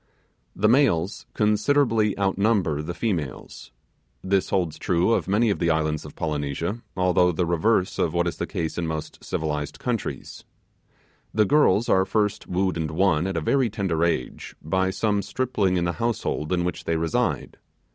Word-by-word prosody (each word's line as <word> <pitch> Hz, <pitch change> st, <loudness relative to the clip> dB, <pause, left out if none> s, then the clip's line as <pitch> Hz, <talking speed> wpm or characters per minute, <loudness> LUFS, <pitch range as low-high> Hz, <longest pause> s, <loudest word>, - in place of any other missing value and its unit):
The 105 Hz, -, +2 dB
males 110 Hz, -, +2 dB
considerably 110 Hz, 0 st, +2 dB
outnumber 100 Hz, -5 st, +1 dB
the 85 Hz, +3 st, -5 dB
females. 85 Hz, -, -4 dB, 0.5 s
This 95 Hz, 0 st, +1 dB
holds 85 Hz, -5 st, -1 dB
true 90 Hz, +4 st, +1 dB
of -, -, 0 dB
many 105 Hz, +3 st, +2 dB
of -, -, -2 dB
the 85 Hz, -, +1 dB
islands 80 Hz, -1 st, 0 dB
of -, -, -11 dB
Polynesia, 80 Hz, -, -3 dB, 0.2 s
although 90 Hz, -1 st, +3 dB
the 85 Hz, +1 st, 0 dB
reverse 90 Hz, +3 st, +1 dB
of 80 Hz, -, +1 dB
what 85 Hz, +1 st, +1 dB
is 85 Hz, -, -3 dB
the -, -, -3 dB
case 80 Hz, +1 st, -3 dB
in 85 Hz, -, -2 dB
most 80 Hz, -1 st, -5 dB
civilized 75 Hz, -2 st, -3 dB
countries. 115 Hz, -, -4 dB, 0.9 s
The 110 Hz, -1 st, +4 dB
girls 120 Hz, -4 st, +3 dB
are 95 Hz, -, +4 dB
first 105 Hz, +1 st, -1 dB
wooed 90 Hz, -1 st, 0 dB
and 80 Hz, -2 st, -2 dB
won, 85 Hz, +1 st, +2 dB
at 95 Hz, -3 st, -2 dB
a -, -, 0 dB
very 130 Hz, -, +2 dB
tender 95 Hz, -6 st, -1 dB
age, 85 Hz, -7 st, -2 dB
by 95 Hz, +4 st, 0 dB
some 100 Hz, +1 st, 0 dB
stripling 105 Hz, -7 st, 0 dB
in 85 Hz, -, 0 dB
the 85 Hz, -, -1 dB
household 115 Hz, -9 st, -1 dB
in 90 Hz, -1 st, +1 dB
which 90 Hz, -2 st, -4 dB
they 85 Hz, -, 0 dB
reside. 80 Hz, 0 st, -1 dB
90 Hz, 165 wpm, -24 LUFS, 80-105 Hz, 0.9 s, The